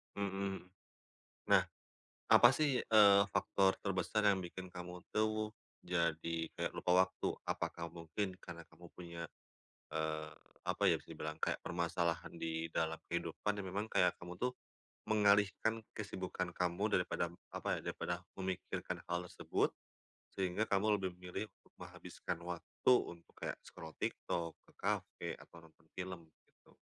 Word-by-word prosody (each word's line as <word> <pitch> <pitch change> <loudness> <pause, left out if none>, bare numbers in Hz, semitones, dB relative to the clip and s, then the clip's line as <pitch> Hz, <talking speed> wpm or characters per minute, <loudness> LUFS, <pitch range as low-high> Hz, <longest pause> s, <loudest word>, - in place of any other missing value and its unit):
Mhm 100 0 0
mhm. 95 0 -1 1.0
Nah, - - +8 0.7
apa 120 - +10
sih, 145 -4 +3
eee, 100 -2 +8
faktor 95 -1 +4
terbesar 100 +2 +1
yang 100 - +4
bikin 95 +1 -7
kamu 90 0 -7
tuh, 110 0 +1 0.3
jadi 85 -1 0 0.2
kayak - - -1
lupa 90 - +1
waktu? 95 - -4 0.2
Apakah 85 0 -2
mungkin, 85 +3 -3
karena 85 -2 -8
kamu 90 - -14
punya, 85 -1 -6 0.6
eee, 80 0 -1 0.3
apa - - -1
ya, - - +4
bisa - - -21
dibilang, 75 +1 -5
kayak - - +2
permasalahan 85 -1 0
di 80 0 -2
dalam 80 0 -1
kehidupan, 85 +5 -1
yang 100 -2 -3
memang 105 +3 -1
kayak, 90 - +4
kamu 90 0 -7
tuh, 125 +4 0 0.5
mengalihkan 105 +1 +4
kesibukan 95 -3 -3
kamu 90 +2 0
daripada 90 -1 0
m 85 - -14 0.2
apa - - 0
ya, - - -3
daripada 90 0 -3 0.2
memikiran 95 -1 -2
hal 90 0 -2
tersebut, - - +1 0.7
sehingga 95 +3 +1
kamu 105 +1 +3
lebih 95 -1 0
memilih, 90 +4 -4 0.3
menghabiskan 85 - -6
waktu 90 +7 0 0.2
untuk, 85 -1 -11
kayak - - -2
scroll 80 -1 -10
TikTok, 85 -1 -1 0.2
ke - - -19
kafe, - - -1
atau - - -15
nonton 80 0 -20
film, 90 -3 -5 0.2
gitu. - - -26
90 Hz, 140 wpm, -37 LUFS, 85-100 Hz, 1.0 s, apa